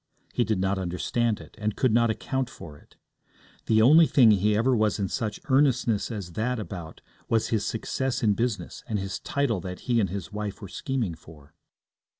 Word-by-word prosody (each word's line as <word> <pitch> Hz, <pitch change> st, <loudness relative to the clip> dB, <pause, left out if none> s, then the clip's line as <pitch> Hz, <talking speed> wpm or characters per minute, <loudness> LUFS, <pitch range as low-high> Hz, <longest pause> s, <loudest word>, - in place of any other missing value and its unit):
He 120 Hz, -, +2 dB
did 110 Hz, -3 st, 0 dB
not 95 Hz, +1 st, 0 dB
understand 105 Hz, +5 st, -1 dB
it, -, -, -13 dB
and 105 Hz, 0 st, -1 dB
could 130 Hz, -4 st, +2 dB
not 115 Hz, 0 st, +4 dB
account 130 Hz, +3 st, -2 dB
for 75 Hz, -3 st, -11 dB
it. -, -, -21 dB, 0.7 s
The 110 Hz, 0 st, +4 dB
only 155 Hz, +6 st, +7 dB
thing 120 Hz, -5 st, +6 dB
he 105 Hz, +1 st, +3 dB
ever 125 Hz, +3 st, +3 dB
was 110 Hz, -2 st, +1 dB
in 100 Hz, -3 st, -2 dB
such 110 Hz, +1 st, -3 dB
earnestness 130 Hz, -6 st, +2 dB
as 100 Hz, -7 st, -6 dB
that 120 Hz, +8 st, -1 dB
about 90 Hz, -7 st, -7 dB, 0.3 s
was 115 Hz, -1 st, +1 dB
his 110 Hz, -3 st, 0 dB
success 130 Hz, +3 st, -2 dB
in 105 Hz, -2 st, +4 dB
business 105 Hz, -5 st, -3 dB
and 110 Hz, -, -1 dB
his 95 Hz, -1 st, -4 dB
title 130 Hz, -9 st, -1 dB
that 90 Hz, +1 st, -7 dB
he 120 Hz, -2 st, +1 dB
and 100 Hz, -4 st, +1 dB
his 95 Hz, -1 st, -6 dB
wife 105 Hz, -1 st, -4 dB
were 100 Hz, -, -9 dB
scheming 120 Hz, -6 st, -2 dB
for. 75 Hz, -2 st, -15 dB
110 Hz, 190 wpm, -26 LUFS, 95-120 Hz, 0.7 s, only